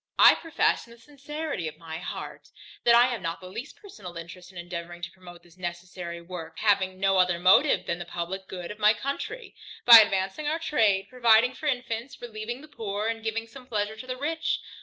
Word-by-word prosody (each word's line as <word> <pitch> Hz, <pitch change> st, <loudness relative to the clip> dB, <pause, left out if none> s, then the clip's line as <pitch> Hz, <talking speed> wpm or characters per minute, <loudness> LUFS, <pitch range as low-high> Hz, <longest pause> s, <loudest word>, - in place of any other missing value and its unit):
I -, -, +9 dB
profess 330 Hz, -5 st, 0 dB
in 235 Hz, -, -14 dB
the -, -, -17 dB
sincerity 290 Hz, -, -5 dB
of 155 Hz, -, -7 dB
my 160 Hz, -1 st, -7 dB
heart, 180 Hz, -, -7 dB, 0.4 s
that 235 Hz, -, +7 dB
I 240 Hz, +1 st, +7 dB
have 240 Hz, -5 st, -3 dB
not 165 Hz, -1 st, -3 dB
the 185 Hz, -, -12 dB
least 250 Hz, +9 st, -7 dB
personal 195 Hz, -, -11 dB
interest 175 Hz, +2 st, -10 dB
in 185 Hz, -, -14 dB
endeavouring 175 Hz, 0 st, -7 dB
to 170 Hz, -, -4 dB
promote 175 Hz, -2 st, -14 dB
this 175 Hz, +1 st, -21 dB
necessary 175 Hz, 0 st, -6 dB
work, 170 Hz, -2 st, -8 dB
having 190 Hz, -3 st, +1 dB
no 195 Hz, -1 st, +3 dB
other 180 Hz, -1 st, +3 dB
motive 190 Hz, -, +4 dB
than 170 Hz, -, -2 dB
the 175 Hz, -, -6 dB
publick 175 Hz, +3 st, -5 dB
good 180 Hz, -1 st, -6 dB
of 210 Hz, -, -10 dB
my 210 Hz, +1 st, +5 dB
country, 390 Hz, -, -5 dB, 0.3 s
by 235 Hz, -2 st, +12 dB
advancing 195 Hz, +6 st, +1 dB
our 310 Hz, +2 st, +1 dB
trade, 220 Hz, -12 st, +2 dB
providing 240 Hz, -1 st, +4 dB
for 300 Hz, -, -6 dB
infants, 245 Hz, -2 st, -3 dB
relieving 240 Hz, +1 st, -6 dB
the 305 Hz, -, -13 dB
poor, 210 Hz, -5 st, -3 dB
and 225 Hz, -1 st, -4 dB
giving 225 Hz, 0 st, -2 dB
some 250 Hz, +2 st, -14 dB
pleasure 215 Hz, -2 st, -2 dB
to 255 Hz, +4 st, -10 dB
the 255 Hz, 0 st, -4 dB
rich. 320 Hz, +4 st, -1 dB
210 Hz, 205 wpm, -27 LUFS, 175-250 Hz, 0.4 s, by